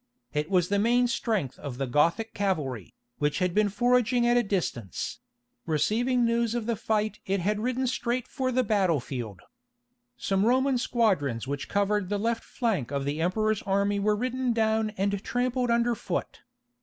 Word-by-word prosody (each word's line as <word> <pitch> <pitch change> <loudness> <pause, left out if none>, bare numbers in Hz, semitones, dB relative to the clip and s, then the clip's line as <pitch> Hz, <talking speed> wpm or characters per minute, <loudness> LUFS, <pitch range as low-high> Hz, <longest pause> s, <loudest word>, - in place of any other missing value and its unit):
It 150 +2 -1
was 180 -3 +2
the 200 0 +2
main 240 +3 +3
strength 220 - -1
of 135 -4 -6
the 135 - -1
Gothic 170 - +1
cavalry, 150 - -2 0.2
which 145 0 +1
had 180 -2 0
been 210 +1 +3
foraging 240 +3 +2
at 240 0 +4
a 245 - +5
distance; 175 - -3 0.5
receiving 235 - +1
news 235 0 +1
of 235 -2 -2
the 235 0 0
fight 215 0 -1
it 195 +1 +1
had 205 +4 0
ridden 255 +3 -1
straight 250 0 -1
for 260 -1 -2
the 255 +1 +2
battle 195 - +2
field. 120 -7 -6 0.8
Some 195 0 0
Roman 260 +3 +3
squadrons 185 - +1
which 140 0 -4
covered 205 -1 +1
the 205 - 0
left 230 +2 -1
flank 215 - -1
of 140 -1 -2
the 145 +3 -2
Emperor's 215 +4 +1
army 200 +1 +1
were 210 +1 +2
ridden 250 +2 -1
down 220 -1 +1
and 200 +1 -1
trampled 250 0 0
under 235 +1 +2
foot. 225 - -4
210 Hz, 170 wpm, -27 LUFS, 175-235 Hz, 0.8 s, a